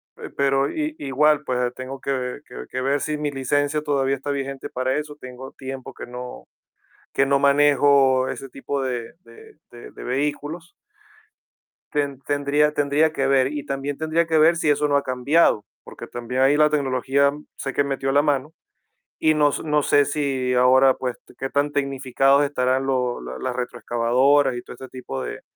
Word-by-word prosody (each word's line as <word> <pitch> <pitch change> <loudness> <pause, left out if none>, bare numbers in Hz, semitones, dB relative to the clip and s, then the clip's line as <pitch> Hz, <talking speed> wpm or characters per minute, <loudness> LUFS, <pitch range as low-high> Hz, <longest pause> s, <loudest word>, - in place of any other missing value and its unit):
pe - - -9
pero, 135 0 +1
i-igual, 150 - +1
pues, 125 -1 -1
tengo 130 +1 -7
que 130 -1 -3
que 125 - -9
que 130 - -3
ver 140 +2 +1
si 150 0 -2
mi 150 -1 -2
licencia, 145 +2 0
todavía 140 -2 0
está 140 +2 -5
vigente 135 -1 -4
para 130 +2 -1
eso. 150 -1 -5
Tengo 130 +1 -9
tiempo 135 -1 -8
que - - -9
no 125 0 -8 0.7
que 135 - +3
no 140 0 +2
manejo, 140 -2 +4
ese 135 - -6
tipo 135 +1 -4
de 120 -3 -4
de 440 -1 -16 0.2
de 120 0 -12
de - - -11
vehículos. 145 +6 -3 1.2
Ten-tendría 145 +1 0
tendría 145 +2 +2
que 135 -3 -1
ver. 135 0 +3
Y 145 -2 -4
también, 140 0 -3
tendría 160 +2 0
que 160 -1 +2
ver, 160 +2 +5
si 165 - 0
eso 150 0 +2
no 145 - +2
ha 140 - +2
cambiado, 130 -2 +2 0.2
porque - - -10
también, 120 +2 -3
ahí 135 +2 +4
la 150 0 +4
tecnología, 140 -1 +1 0.2
sé 135 -1 -4
que 145 - +1
metió 135 -1 -2
la 145 +1 +4
mano, 145 0 0 0.7
y 155 - +3
no 150 -1 +3
s - - -4
no 150 -1 +1
sé 145 0 +4
si 135 -3 -1
ahora, 130 +1 +5
pues, 125 -1 -4 0.2
qué 135 - -4
tan 145 +1 0
tecnificados 135 0 +2
estarán 130 -2 0
lo 125 -2 -1
la 65 +1 -7
las 130 -1 -3
retroexcavadoras, 125 +3 +1
y - - -5
todo - - -10
este 130 +1 -11
tipo 125 - -6
de 60 - -6
135 Hz, 180 wpm, -23 LUFS, 130-145 Hz, 1.2 s, ver